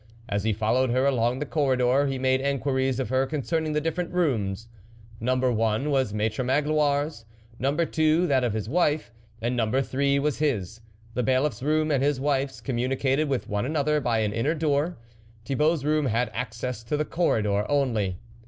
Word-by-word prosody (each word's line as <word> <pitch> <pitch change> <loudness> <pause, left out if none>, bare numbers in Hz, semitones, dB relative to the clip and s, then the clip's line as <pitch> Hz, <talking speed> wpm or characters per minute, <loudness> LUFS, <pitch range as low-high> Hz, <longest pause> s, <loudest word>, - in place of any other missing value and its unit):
As 100 -1 -1
he 110 - +2
fol 110 +1 0
lowed 130 0 +2
her 130 +3 +2
along 125 -2 +1
the 150 - -3
corridor, 135 -2 +2
he 135 -1 -2
made 130 0 +1
en 140 0 0
quiries 130 -1 0
of 130 - -2
her 130 +1 +1
concerning 155 +2 -1
the 150 - +2
different 165 +3 -2
rooms. 115 - -1 0.5
Number 130 +2 +1
one 115 +5 0
was 130 -6 +1
Maitre 110 +4 -1
Magloire's, 145 0 +1 0.4
number 140 +6 +1
two 160 +2 +2
that 135 -5 +2
of 120 -4 0
his 110 -1 -3
wife, 150 -1 +1 0.3
and 120 +2 0
num 115 -3 +1
ber 135 +4 +1
three 140 +1 +1
was 145 0 0
his. 115 - -1 0.3
The 125 - 0
Bailiff's 130 +4 +1
room, 155 +2 +1
and 140 -3 +2
his 140 -1 +1
wife's, 135 -1 -1
communicated 135 +3 0
with 135 -3 -1
one 105 0 -1
another 150 +2 0
by 115 -3 +1
an 105 -1 -1
inner 135 +9 0
door; 155 +2 0 0.5
Thibault's 150 +3 +1
room 150 -1 +2
had 115 0 0
access 115 0 -4
to 150 +6 -1
the 150 - 0
corridor 105 - 0
only. 115 -10 0
135 Hz, 185 wpm, -26 LUFS, 120-150 Hz, 0.5 s, he